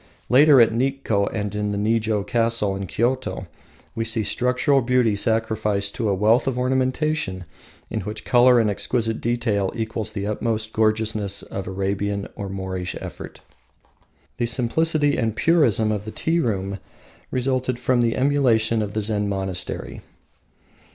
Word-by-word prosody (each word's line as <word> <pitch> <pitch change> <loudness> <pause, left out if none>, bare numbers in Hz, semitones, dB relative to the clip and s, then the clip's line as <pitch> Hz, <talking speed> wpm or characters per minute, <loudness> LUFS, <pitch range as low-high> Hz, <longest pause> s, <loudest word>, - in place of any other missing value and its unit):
Later, 140 +2 +7
at 115 -1 +5
Nikko 120 -5 0
and 105 -2 -3
in 105 0 -2
the 100 - -2
Nijo 110 0 0
castle 115 -1 0
in 95 0 -5
Kyoto, 125 +7 -1 0.5
we 115 - -2
see 115 -1 0
structural 125 +6 +1
beauty 120 -3 +2
sacrificed 110 -2 0
to 110 -3 -1
a - - +2
wealth 110 +7 +3
of 130 -2 -1
ornamentation 130 -5 0 0.6
which 105 +2 -6
in - - -25
colour 125 0 +5
and 115 - +2
exquisite 115 +2 -1
detail 115 -5 0
equals 110 -1 -3
the 100 -2 -3
utmost 110 +1 -2
gorgeousness 110 -2 0
of 95 -1 -6
Arabian 100 +1 -2
or 100 -1 -5
Moorish 95 -2 -4
effort. - - -9 1.0
The 120 - 0
simplicity 145 +5 +1
and 110 -3 -1
purism 120 - +3
of 105 -1 -3
the - - -5
tea 165 +7 0
room 100 - -2 0.5
resulted 130 -1 -1
from 125 0 +1
emulation 115 -3 +2
of 105 -1 -4
the 110 - 0
Zen 105 -1 -1
monastery. 95 -2 -3
110 Hz, 145 wpm, -22 LUFS, 100-125 Hz, 1.0 s, Later